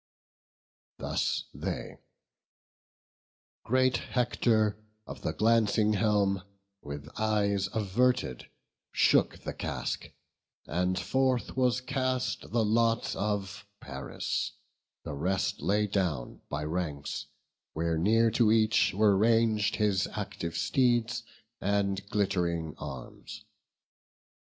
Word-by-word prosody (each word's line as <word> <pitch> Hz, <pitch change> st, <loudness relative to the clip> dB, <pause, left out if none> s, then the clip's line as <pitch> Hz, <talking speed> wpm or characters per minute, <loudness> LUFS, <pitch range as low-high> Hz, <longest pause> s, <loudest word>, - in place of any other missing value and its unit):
Thus -, -, -1 dB
they; -, -, -5 dB, 1.6 s
great 130 Hz, -1 st, +3 dB
Hector 110 Hz, -4 st, +1 dB, 0.3 s
of -, -, -9 dB
the -, -, -1 dB
glancing 110 Hz, -1 st, +3 dB
helm, 100 Hz, -2 st, +2 dB, 0.4 s
With 70 Hz, 0 st, -7 dB
eyes 100 Hz, -3 st, +1 dB
averted, 110 Hz, -, 0 dB, 0.4 s
shook -, -, +3 dB
the -, -, -4 dB
casque; -, -, -4 dB, 0.6 s
and 90 Hz, +3 st, 0 dB
forth 130 Hz, +3 st, 0 dB
Was 130 Hz, -1 st, +2 dB
cast 130 Hz, -1 st, -1 dB
the 115 Hz, -2 st, +2 dB
lot 115 Hz, +1 st, +2 dB
of 100 Hz, -1 st, -3 dB
Paris; 70 Hz, -1 st, -3 dB
on -, -, -31 dB, 0.5 s
the -, -, -5 dB
ground 70 Hz, -, -6 dB
The -, -, -6 dB
rest 95 Hz, 0 st, 0 dB
lay 105 Hz, +2 st, +2 dB
down 90 Hz, -11 st, -2 dB
by 75 Hz, 0 st, -3 dB
ranks, 75 Hz, -3 st, -3 dB, 0.5 s
where 80 Hz, 0 st, 0 dB
near 115 Hz, +5 st, +4 dB
to 115 Hz, -1 st, +4 dB
each 110 Hz, -3 st, +3 dB
Were 105 Hz, -1 st, +5 dB
rang'd 110 Hz, 0 st, +3 dB
his 105 Hz, -3 st, +1 dB
active 100 Hz, -5 st, -4 dB
steeds, 120 Hz, +2 st, +2 dB, 0.4 s
and 100 Hz, -1 st, 0 dB
glitt'ring 90 Hz, -6 st, 0 dB
arms. 65 Hz, -4 st, -8 dB
105 Hz, 105 wpm, -29 LUFS, 90-115 Hz, 1.6 s, Were